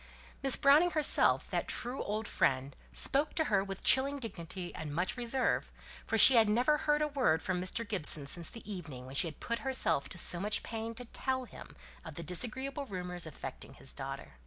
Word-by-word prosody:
Miss 270 -2 +4
Browning 295 +5 +4
herself, 310 -4 +3
that - - -2
true 245 +3 -4
old 215 +1 -3
friend, 135 +1 0 0.2
spoke 285 +2 0
to 320 - +2
her 200 -9 +1
with 195 -1 -7
chilling 275 +2 +3
dignity, 185 -7 -5
and 150 -2 -7
much 180 +3 -1
reserve; 250 +1 -1 0.4
for 225 - 0
she 250 +3 +10
had 220 -2 +5
never 245 +8 +2
heard 300 0 0
a - - 0
word 255 - 0
from 180 -1 -2
Mr. 215 +5 -1
Gibson 155 -8 +1
since 165 +3 -1
the 230 - -12
evening 155 -11 -7
when 130 - -10
she 140 - +4
had 155 - -10
put 235 0 -3
herself 260 - 0
to - - -4
so 175 0 +4
much 205 +3 -1
pain 225 0 -6
to 245 - -8
tell 260 +2 -3
him - - -13 0.3
of 160 -4 -10
the 170 - -7
disagreeable 260 - -1
rumours 180 -3 -4
affecting 135 -2 -9
his 135 - -3
daughter. 135 - -8
210 Hz, 200 wpm, -32 LUFS, 165-260 Hz, 0.4 s, she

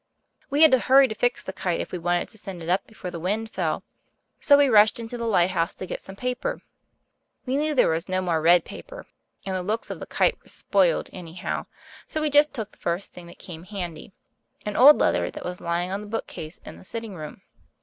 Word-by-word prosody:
We 290 +3 +4
had 315 - +8
to 260 - +5
hurry 270 +2 +6
to - - -2
fix 245 +3 0
the 190 - -6
kite 180 -3 -2
if - - -4
we 180 - -4
wanted 175 +1 0
to 220 - -12
send 185 -4 -8
it 165 - -6
up 185 +2 +1
before 185 -5 -8
the 170 - -6
wind 215 +6 -2
fell, - - -2 0.6
so 285 - +6
we 285 -1 +5
rushed 215 -2 +5
into 230 +1 -6
the 235 -1 -3
lighthouse 180 -4 +2
to - - -6
get - - -5
some 190 - -11
paper. 250 +3 -3 0.8
We 255 0 -1
knew 300 +1 +1
there 255 - +5
was 165 +3 -1
no 185 0 +1
more 170 -4 0
red 170 +1 +5
paper, - - -10 0.4
and 190 -1 -2
the 185 - -1
looks 215 +5 -3
of - - -6
the - - -8
kite 480 - +1
were - - -24
spoiled, 185 -5 +1
anyhow, 180 +1 -5 0.4
so 310 - -3
we 305 -1 0
just 290 +1 +5
took 220 -6 -5
the - - -25
first 175 +3 -3
thing 175 -1 -11
that 170 - -13
came 165 -3 -9
handy 185 -4 -6 0.5
an 210 - -3
old 290 +4 +9
letter - - +2
that - - -8
was 180 0 -5
lying 170 +2 -1
on 195 +1 -2
the 210 - -9
bookcase 195 -7 -6
in - - -9
the - - -14
sitting 225 +1 -6
room. 155 -4 -9
195 Hz, 230 wpm, -25 LUFS, 175-240 Hz, 0.8 s, old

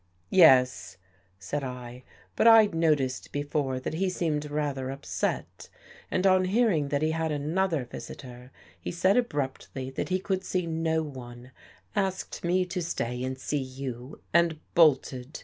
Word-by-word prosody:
" - - -40
" 85 - -40
Yes," 125 - +5 0.4
said 105 +9 -4
1. 125 -1 -7 0.2
" - - -30
But - - +4
I'd 220 -4 +7
noticed 150 -6 0
before 145 -2 -1
that 130 - -4
he 185 +4 0
seemed 150 -5 -2
rather 145 -3 -2
upset. 135 +1 -4 0.4
And, 185 - 0
on 185 -1 +5
hearing 190 -7 +2
that 140 +1 -1
he 155 - +2
had 160 0 -1
another 155 0 0
visitor, 125 0 -10 0.3
he - - -5
said 185 +3 +2
abruptly 135 - -2
that 135 - -4
he 185 - +2
could 190 0 -2
see 180 -2 -1
no 160 -1 0
one, 125 -3 -10 0.4
asked 190 -2 -2
me 180 +2 +2
to 180 0 -4
stay 125 -7 -3
and 130 0 -3
see 145 +2 -2
you, 130 0 -7
and 170 -2 +3
bolted. 140 -4 +2
150 Hz, 160 wpm, -28 LUFS, 130-175 Hz, 0.4 s, I'd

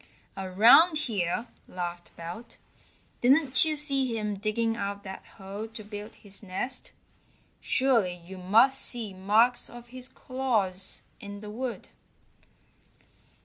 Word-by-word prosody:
"Around 220 - +6
here!" 205 0 -1 0.2
laughed 175 -1 -6
Belt. 170 +8 -9 0.6
"Didn't 275 +3 +5
you 310 -1 +1
see 275 -5 +1
him 210 -1 -2
digging 225 +3 -1
out 200 -2 -4
that 190 - -8
hole 200 +3 -6
to 225 -1 -10
build 205 +1 -8
his 200 -2 -6
nest? 215 +6 -4 0.7
Surely 230 -9 +2
you 190 +1 -9
must 230 +9 +4
see 225 -5 -3
marks 220 +6 +3
of 240 0 -12
his 255 0 -5
claws 215 -8 -1 0.2
in 205 -2 -8
the 210 -1 -8
wood." 245 +2 -5
215 Hz, 120 wpm, -28 LUFS, 195-250 Hz, 0.7 s, Around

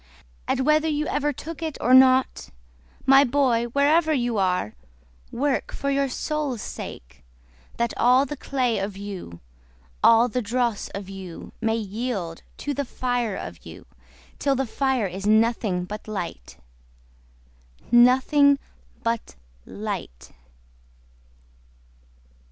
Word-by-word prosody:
And - - 0
whether 305 +3 +3
you 300 -1 0
ever 295 0 0
took 320 +4 -8
it 315 -3 -4
or 250 - +2
not, 260 - +5 0.6
My, 270 +1 +7
boy, 250 -3 +2
wherever 295 +6 +2
you 240 -6 0
are, 180 - 0 0.6
Work 280 +1 -1
for 280 0 -2
your 275 0 +1
soul's 295 -2 -2
sake, 65 +3 -9 0.5
That 235 -1 0
all 250 +3 +4
the 295 - -5
clay 255 -5 -1
of 195 0 -4
you, 195 - -8 0.6
all 230 +1 +7
of 245 - -5
the 250 - 0
dross 235 -1 -1
of 200 -1 -6
you, 190 -3 -9
May 225 -1 +1
yield 205 -5 -4 0.2
to 290 - -1
the 285 - -2
fire 245 -4 -2
of 85 -1 -8
you, 85 +2 -11 0.5
Till 275 -1 +1
the 270 +1 0
fire 265 -1 0
is 195 +2 -4
nothing 215 -4 +2
but 210 +3 -8
light!… 180 - -6 1.3
Nothing 260 +4 +5 0.5
but 230 -1 -2 0.3
light! 190 - -6
240 Hz, 125 wpm, -24 LUFS, 200-275 Hz, 1.3 s, My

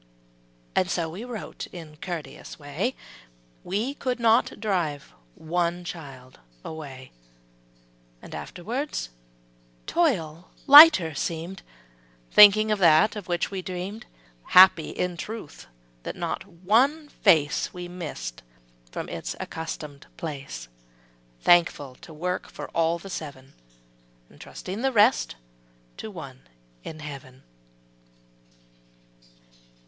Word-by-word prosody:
'' - - -35
And 180 - +2
so 170 -2 -1
we 190 +7 -7
wrote 240 -3 -7
in 160 -4 -11
courteous 170 -2 -7
way, 155 - -3 0.7
We 210 +9 -2
could 255 -3 -3
not 230 0 +3
drive 175 -9 -2 0.2
one 175 +2 -2
child 135 -7 -10 0.3
away, 135 -5 -8 1.1
And - - -12
afterward, 245 - -5 0.9
toil 180 - 0 0.2
lighter 285 - +9
seemed, 170 +6 -4 0.7
Thinking 215 +1 +8
of 210 - +1
that 170 +4 +5
of 210 -3 -7
which 175 +1 -1
we 195 -1 -4
dreamed; 185 +4 -6 0.4
Happy, 185 -3 +7
in 180 -1 -3
truth, 215 - -8 0.3
that - - -6
not - - -4
one 245 - +1
face 160 - +2
We 180 -1 -7
missed 150 - -7 0.5
from - - -5
its - - -5
accustomed 150 -3 -7
place; 135 - -6 0.7
Thankful 170 -6 +3
to - - -12
work 180 +4 -4
for - - -8
all 165 0 +1
the 195 +3 -10
seven, 140 -5 -8 0.9
Trusting 195 +5 -7
the 270 +1 +1
rest 220 - +3 0.6
to - - -7
One - - -10 0.4
in 155 0 -8
heaven! 135 -3 -10
175 Hz, 110 wpm, -25 LUFS, 150-205 Hz, 1.1 s, lighter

